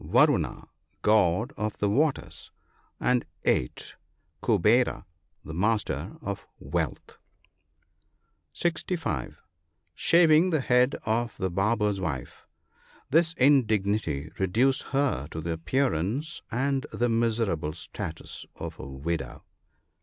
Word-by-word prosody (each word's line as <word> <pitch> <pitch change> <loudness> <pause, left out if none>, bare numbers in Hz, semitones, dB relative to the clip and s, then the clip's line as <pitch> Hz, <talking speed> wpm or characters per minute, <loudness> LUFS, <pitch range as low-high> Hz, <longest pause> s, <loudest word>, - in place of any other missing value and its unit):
Varuna, - - +2 0.4
God 105 +3 +3
of 105 0 -3
the 105 - +1
waters; 100 - -1 0.5
and 125 -1 +2 0.2
8. - - 0 0.5
Kuvera, 115 +1 +3 0.4
the 80 - -7
master 95 - -1
of 100 -1 -5
wealth. - - -4 1.3
(65.) 165 - -2 0.6
Shaving 165 - +5
the 155 -5 +1
head 125 +1 +3
of 115 +2 -1
the 95 -2 -1
barber's 105 +1 +1
wife. 70 -8 -5 0.3
— - - -29
This 165 +2 +4
indignity 105 - +2
reduced 115 +8 +2
her 135 - 0
to 80 - -6
the 85 +1 -3
appearance 125 - -1
and 135 +3 0
the 120 - 0
miserable 115 -9 0
status - - -7
of - - -7
a - - -7
widow. 70 -1 -4
110 Hz, 105 wpm, -27 LUFS, 85-135 Hz, 1.3 s, Shaving